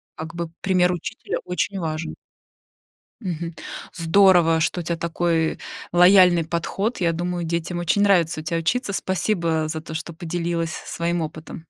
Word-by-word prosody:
Как 160 +1 -7
бы 170 -1 -4
пример 180 -2 +3
учителя 240 - -4
очень 195 +2 -2
важен. 160 -1 -3 1.1
Мгм. 170 -3 -4 0.4
Здорово, 170 -1 +4
что 175 - 0
у - - -4
тя 170 +1 -1
такой 165 -1 0 0.3
лояльный 180 -1 +6
подход. 190 +6 -2
Я 170 -1 +3
думаю, 175 +1 -2
детям 170 +1 -2
очень 175 +4 +1
нравится 175 -5 +3
у - - -7
тя 165 +2 -2
учиться. 200 +5 -1
Спасибо 170 -5 0
за 160 0 -4
то, 160 - -9
что 165 +1 -5
поделилась 170 0 -2
своим 170 +1 -2
опытом. 155 0 -6
170 Hz, 150 wpm, -23 LUFS, 165-180 Hz, 1.1 s, лояльный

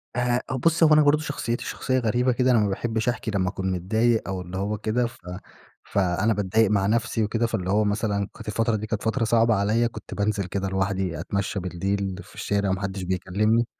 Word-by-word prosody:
آآ 125 0 +1 0.2
بصي 165 0 +5
هو 155 - +6
أنا 155 - +7
برضه 150 +1 +4
شخصيتي 140 -6 -3
شخصية 130 -1 -1
غريبة 125 +2 +1
كده 125 +1 +2
أنا 120 - +5
ما 105 -1 +2
باحبش 110 +3 -1
أحكي 120 -2 -2
لما 95 -3 0
أكون 95 -1 -3
متضايق، 110 +6 +1
أو 95 -1 -3
اللي 90 +1 -7
هو 105 +2 -1
كده 110 +3 0
ف 115 - -13 0.7
فأنا 95 +3 +1
باتضايق 105 +1 +2
مع 100 -2 +2
نفسِي 115 0 +1
وكده، 115 +2 0
فاللي 100 -6 -3
هو 105 +3 +3
مثلًا 105 -1 0
كانت - - -12
الفترة 115 +1 +1
دي 110 0 -4
كانت 110 +2 -3
فترة 115 +2 0
صعبة 115 0 +3
عليَّ 110 +4 +2
كنت - - -9
بانزِل 100 -1 0
كده 95 +2 -3
لوحدي 95 -3 -1
أتمشى 100 +4 -2
بالليل 95 +2 -2
في - - -18
الشارع 100 -1 -1
وما 95 +1 -1
حدش 95 -1 -3
بيكلمني. 100 +5 +1
105 Hz, 205 wpm, -25 LUFS, 95-115 Hz, 0.7 s, أنا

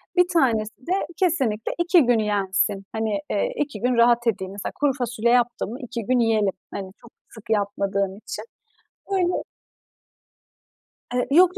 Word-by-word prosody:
bir 360 -1 +5
tanesi 235 -6 +1
de 360 - +1 0.2
kesinlikle 270 - +1
2 345 0 +5
gün 240 -1 +3
yensin. 195 -1 0
Hani, 220 -2 -1
iii, 205 - 0
2 295 -1 -3
gün 250 +1 +2
rahat 235 0 +4
edeyim. 190 -4 -1
Mesela 200 0 -5
kuru 290 -1 +2
fasulye 240 -3 0
yaptım 240 -3 +2
mı 245 - -6
2 235 -3 -5
gün 255 +3 +2
yiyelim. 220 -4 +2 0.2
Hani 190 -2 -6
çok 235 - -16 0.2
sık 220 0 -14
yapmadığım 200 -2 0
için. 215 0 -7 0.7
Böyle 360 -2 +1 1.7
Eee, 250 0 0
yok, 365 +5 +5
230 Hz, 150 wpm, -24 LUFS, 205-260 Hz, 1.7 s, bir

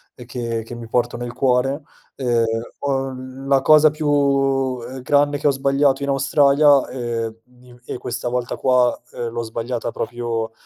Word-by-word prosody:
ehm, 125 - -11
che 115 -2 -4
che 115 +2 -9
mi 120 -1 -8
porto 120 +1 0
nel 120 0 -5
cuore, 135 +3 +1 0.3
ehm, 120 -3 +1 0.4
ho 135 -1 -1
l 130 +1 -9
la 135 -1 +4
cosa 155 +2 +6
più, 140 -3 +1
ehm, 130 0 -8
grande 145 +2 +2
che 145 - +1
ho - - +5
sbagliato 140 0 +1
in 140 - -2
Australia, 140 0 +4
ehm, 115 -3 -3 0.3
i 125 -1 -16
e - - -5
questa 120 0 -4
volta 125 0 -2
qua, 125 -2 +2
ehm, 120 - -4
l'ho 115 +1 -4
sbagliata 115 +1 -4
proprio 115 -1 -3
130 Hz, 170 wpm, -21 LUFS, 120-140 Hz, 0.4 s, cosa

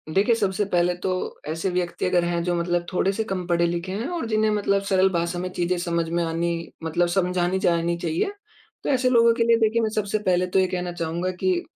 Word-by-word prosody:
देखिए, 210 +5 +4
सबसे 200 -1 0
पहले 180 -2 +1
तो 185 -1 -2
ऐसे 165 +4 -2
व्यक्ति 180 -1 -2
अगर 180 -1 +2
हैं 170 0 0
जो 175 0 0
मतलब 175 0 0
थोड़े 185 +1 +1
से 220 - -1
कम 190 -4 -4
पढ़े 170 -1 +2
लिखे 175 +2 -3
हैं 215 +7 -3
और 325 - -3
जिन्हें 215 -1 +2
मतलब 200 -1 +1
सरल 190 0 +4
भाषा 170 0 -1
में 185 +1 -3
चीज़ें 175 +1 0
समझ 170 -1 -1
में 170 +1 0
आनी 165 +1 -1 0.3
मतलब 170 +2 +1
समझानी 180 0 +1
जानी 170 -1 +1
चाहिए। 170 - -1 0.5
तो - - -2
ऐसे 255 -2 +2
लोगों 235 -2 +5
के 230 - +1
लिए 230 0 +4
देखिए 225 +1 +2
मैं 220 - +1
सबसे 215 0 0
पहले 185 -3 +1
तो 180 - +2
ये 185 - +3
कहना 180 -1 -3
चाहूँगा 170 +2 -2
कि 185 -2 +1
180 Hz, 225 wpm, -24 LUFS, 175-200 Hz, 0.5 s, लोगों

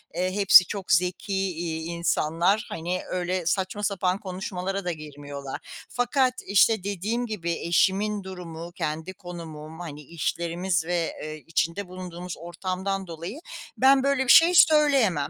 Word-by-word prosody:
eee, 185 +1 0
hepsi 195 -3 +8
çok 195 -5 -5
zeki, 180 +5 +1
iii, 170 -4 -2
insanlar. 170 +4 +1
Hani, 175 +3 -3
öyle 180 -1 -2
saçma 190 +3 -1
sapan 190 -2 0
konuşmalara 190 0 -4
da 175 - 0
girmiyorlar. 145 -3 -7 0.3
Fakat, 250 +1 +1
işte, 205 0 +4
dediğim 205 +5 -2
gibi 180 -7 -3
eşimin 195 +5 +1
durumu, 175 -3 -8
kendi 160 +3 -4
konumum, 165 -3 -9
hani, 150 -4 -7
işlerimiz 170 +2 -2
ve, 175 -1 -1
ııı, 155 - -5
içinde 165 +5 -2
bulunduğumuz 180 -1 -7
ortamdan 185 +3 -4
dolayı 170 - -7 0.4
ben 270 0 +5
böyle 275 -1 +2
bir 250 - -5
şey 345 +2 +7
söyleyemem. 275 - +5
180 Hz, 135 wpm, -26 LUFS, 165-200 Hz, 0.4 s, hepsi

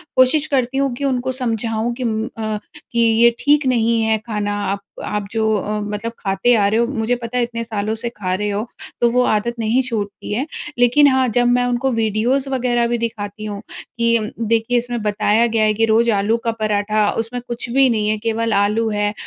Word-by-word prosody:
कोशिश 265 +4 +4
करती 265 -1 0
हूँ 275 -2 +1
कि 280 - -6
उनको 260 -1 0
समझाऊँ 230 -2 -1
कि 255 - -5
उम, 220 -1 -1
अ, 215 -1 -2 0.3
कि, 235 - -1
"ये 230 +1 +5
ठीक 295 0 +3
नहीं 230 -2 +2
है 220 0 +2
खाना, 205 -2 -2
आप 195 +1 -1 0.3
आप 210 -1 -3
जो 225 -1 0
अ, 210 +1 -2
मतलब 210 +2 -4
खाते 195 +4 +1
आ 200 -2 +3
रहे 220 +3 +1
हो, 235 - +3
मुझे 245 -2 -1
पता 245 0 -5
है, 245 - +2
इतने 230 -1 -4
सालों 215 -1 -2
से 235 +2 -3
खा 195 -6 -4
रहे 210 +2 -2
हो, 210 +3 -2 0.3
तो 240 - +5
वो 250 +1 +3
आदत 225 +2 0
नहीं 230 +4 +2
छूटती 215 -5 -4
है।" 250 +6 -1 0.3
लेकिन 245 +5 +5
हाँ, 260 -1 +3
जब 245 +2 +2
मैं 245 0 +3
उनको 245 +2 0
वीडियोज़ 230 +5 0
वग़ैरह 240 -2 +1
भी 240 0 0
दिखाती 215 -2 -4
हूँ 205 -1 -5
कि, 235 -1 0 0.2
"देखिए, 230 +1 +1
इसमें 240 -1 -2
बताया 210 +2 +2
गया 225 -1 +1
है 215 0 +3
कि 225 +2 +2
रोज़ 230 +1 +3
आलू 205 +3 +1
का 230 - +2
पराठा, 210 0 +1
उसमें 230 +2 -3
कुछ 240 +1 -5
भी 265 +2 +4
नहीं 215 -3 0
है, 215 - +1
केवल 225 0 -1
आलू 210 +3 +2
है 205 -1 0
230 Hz, 210 wpm, -19 LUFS, 215-245 Hz, 0.3 s, ये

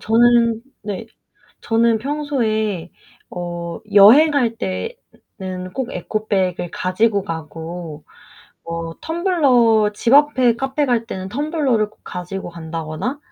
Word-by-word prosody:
저는 230 0 +3 0.2
네. 205 +2 -5 0.6
저는 230 0 +2
평소에 220 - -2 0.4
어 175 -1 -5
여행할 235 +3 +6
때는 185 - -6
꼭 260 -1 -3
에코백을 190 -5 -2
가지고 200 +2 +1
가고 165 -2 -7 0.6
어 165 0 -5
텀블러 260 - +3
집앞에 260 -1 +4
카페 270 +3 -1
갈 235 -3 +1
때는 190 -3 -5
텀블러를 270 -5 0
꼭 - - -28
가지고 185 +1 -6
간다거나 165 - -5
220 Hz, 215 characters per minute, -20 LUFS, 180-255 Hz, 0.6 s, 여행할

